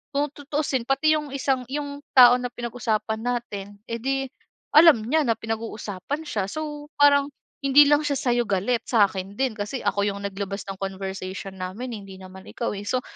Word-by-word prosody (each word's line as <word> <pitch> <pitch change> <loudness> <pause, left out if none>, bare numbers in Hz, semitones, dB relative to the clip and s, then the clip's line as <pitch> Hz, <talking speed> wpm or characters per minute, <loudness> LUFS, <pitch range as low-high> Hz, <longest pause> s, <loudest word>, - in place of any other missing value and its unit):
kung 290 +1 +1
tutuusin 285 -3 -2
pati 310 +3 +3
'yong 300 -2 -4
isang 265 -1 0
'yong 285 0 -4 0.2
tao 245 -1 +10
na 245 - -2
pinag-usapan 220 -3 -2
natin, 205 -5 -4
eh, 230 0 -3
di 270 +2 0 0.5
alam 310 -8 +7
niya 310 +6 +2
na 230 - +3
pinag-uusapan 225 - -4
siya. 205 -7 -1
So, 295 0 -5
parang 285 -1 +6 0.3
hindi 280 +1 +6
lang 295 +1 +3
siya 290 - +1
sa'yo 240 -1 +1
galit, 205 +5 0
sa'kin 195 -4 +1
din 260 -4 -1
kasi 210 +6 -4
ako 200 0 0
'yong 200 0 -3
naglabas 200 0 -4
ng 195 - -5
conversation 190 0 -5
namin, 200 +8 -5
eh, - - -6
hindi 195 -1 -11
naman 190 0 -12
ikaw, 235 - -3
eh. 200 - -6
So, 255 +1 0
240 Hz, 180 wpm, -24 LUFS, 200-280 Hz, 0.5 s, tao